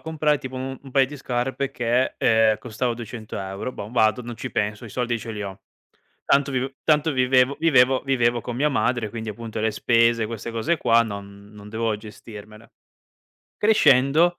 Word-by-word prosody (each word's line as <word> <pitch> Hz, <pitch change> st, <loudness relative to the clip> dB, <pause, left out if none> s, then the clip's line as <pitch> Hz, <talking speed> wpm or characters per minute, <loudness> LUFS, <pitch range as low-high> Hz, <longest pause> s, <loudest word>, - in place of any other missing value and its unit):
comprare 155 Hz, -2 st, 0 dB
tipo 130 Hz, -1 st, -8 dB
un-un 130 Hz, +1 st, -6 dB
paio 135 Hz, +1 st, +4 dB
di 145 Hz, +3 st, -8 dB
scarpe 130 Hz, +2 st, -2 dB
che, 120 Hz, -1 st, 0 dB
ehm, 110 Hz, -1 st, +3 dB
costava 120 Hz, +2 st, -3 dB
200€. 110 Hz, -2 st, -6 dB
Bom, 105 Hz, 0 st, -8 dB
vado, 110 Hz, +1 st, +2 dB
non 120 Hz, -1 st, -7 dB
ci 130 Hz, -, -5 dB
penso, 105 Hz, +3 st, -2 dB
i -, -, -10 dB
soldi 120 Hz, +1 st, -2 dB
ce 115 Hz, +1 st, -7 dB
li 105 Hz, -1 st, -5 dB
ho. 95 Hz, -1 st, -7 dB, 0.6 s
Tanto 140 Hz, 0 st, +2 dB
viv 130 Hz, +1 st, -2 dB
tanto 155 Hz, +1 st, +3 dB
vivevo 130 Hz, +1 st, +3 dB
vivevo 130 Hz, -5 st, +4 dB
vivevo 120 Hz, -3 st, +1 dB
con 120 Hz, -, -6 dB
mia 145 Hz, +5 st, +1 dB
madre, 125 Hz, -5 st, 0 dB
quindi 110 Hz, -1 st, -6 dB
appunto 115 Hz, +1 st, -7 dB
le 110 Hz, 0 st, 0 dB
spese, 115 Hz, +1 st, +2 dB
queste 115 Hz, +1 st, -6 dB
cose 115 Hz, +10 st, 0 dB
qua 115 Hz, -5 st, +4 dB
non 100 Hz, -2 st, -8 dB
non 105 Hz, 0 st, -12 dB
devo 110 Hz, 0 st, -1 dB
gestirmele. 105 Hz, +1 st, -12 dB, 0.9 s
Crescendo, 170 Hz, -, +4 dB
120 Hz, 170 wpm, -23 LUFS, 110-130 Hz, 0.9 s, paio